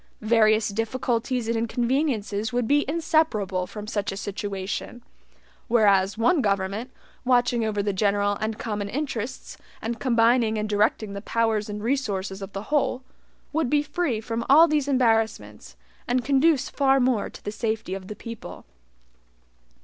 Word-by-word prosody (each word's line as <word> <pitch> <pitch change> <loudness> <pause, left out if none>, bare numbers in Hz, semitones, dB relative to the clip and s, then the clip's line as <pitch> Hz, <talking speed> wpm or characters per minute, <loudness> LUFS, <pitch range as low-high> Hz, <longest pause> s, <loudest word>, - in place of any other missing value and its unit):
Various 215 -1 +4
difficulties 230 +2 -1
and 230 - 0
inconveniences 230 -2 -1
would 245 -2 0
be 290 +1 +3
inseparable 290 - +1
from 210 -1 -8
such 205 -2 -2
a 195 - -6
situation; 200 +3 -5 0.6
whereas 200 -4 +3
one 280 +8 +3
government, 200 +3 -1 0.3
watching 245 -2 +2
over 210 -2 -1
the 205 0 -1
general 205 +1 +1
and 215 0 -2
common 205 -2 -3
interests, 255 -2 -4 0.2
and 230 0 -4
combining 230 -1 +3
and 210 0 -1
directing 210 0 +1
the 200 - -5
powers 220 -1 0
and 210 0 -5
resources 205 -7 -2
of 195 0 -8
the 195 +1 -5
whole, 265 -3 +1 0.5
would 315 -4 0
be 295 +1 +2
free 300 -7 -1
from 230 +1 -3
all 315 +5 +8
these 300 -3 0
embarrassments, 225 - 0 0.3
and 245 -1 0
conduce 280 +1 +3
far 270 -1 +2
more 250 -4 +1
to - - -13
the 205 - -2
safety 220 -3 -3
of 190 -1 -6
the 210 - -6
people. 230 0 -9
225 Hz, 150 wpm, -25 LUFS, 205-255 Hz, 0.6 s, all